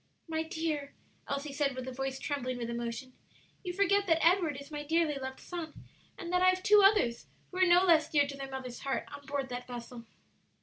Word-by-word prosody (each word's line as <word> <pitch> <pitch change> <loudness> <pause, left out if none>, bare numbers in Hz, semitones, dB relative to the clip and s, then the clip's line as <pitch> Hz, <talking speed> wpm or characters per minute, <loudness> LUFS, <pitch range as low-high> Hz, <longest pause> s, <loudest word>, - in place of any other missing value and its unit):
"My 320 -1 -1
dear," 315 -3 -3 0.3
Elsie 280 +1 -3
said, 280 -2 0
with 255 0 -5
a - - -3
voice 270 +1 -3
trembling 255 -4 -3
with 235 -1 -4
emotion, 235 +2 -4 0.5
"you 360 - -3
forget 400 +2 +2
that 325 -1 +3
Edward 335 -5 +3
is 280 +2 -12
my 295 -1 -4
dearly 320 0 +2
loved 265 0 -6
son, 335 -4 -7 0.3
and 355 -1 -6
that 360 - +3
I 370 - +7
have 370 0 0
two 415 +1 +7
others, 390 - +3 0.2
who 365 - -7
are 370 - +5
no 355 +1 +6
less 325 -3 +4
dear 290 -2 +4
to 280 0 -6
their 275 -1 -6
mother's 260 -2 -6
heart, 270 -1 -2
on 285 - -12
board 275 -1 -2
that 245 0 -5
vessel." 240 -1 -8
285 Hz, 215 wpm, -31 LUFS, 260-340 Hz, 0.5 s, I